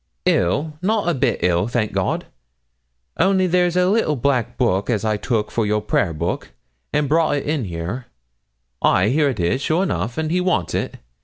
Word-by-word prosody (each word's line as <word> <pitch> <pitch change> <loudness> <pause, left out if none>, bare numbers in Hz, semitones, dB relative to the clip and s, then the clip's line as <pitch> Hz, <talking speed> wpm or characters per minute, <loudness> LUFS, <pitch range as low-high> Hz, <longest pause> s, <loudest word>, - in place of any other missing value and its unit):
'Ill! 145 - +1
not 210 +1 0
a 175 - +3
bit 130 -4 0
ill, 90 +2 +2
thank 120 -3 -1
God. - - -1 0.9
Only 190 0 +3
there's 180 0 +2
a 180 0 +4
little 195 -6 +2
black 130 -2 0
book 110 -5 +1
as 110 -2 0
I 110 -1 +1
took 110 0 -1
for 115 - 0
your 105 0 +1
prayer 100 -3 0
book, 85 +2 -3 0.4
and 150 -1 +1
brought 155 0 +2
in 145 -3 -1
here; 90 +8 -5 0.7
ay, 95 +3 +3
here 145 +3 +3
it 125 - -4
is, 85 +10 +1
sure 160 +5 +1
enough, 125 - -2
and 160 0 -1
he 180 +1 +2
wants 180 - 0
it. - - -2
130 Hz, 180 wpm, -21 LUFS, 105-165 Hz, 0.9 s, a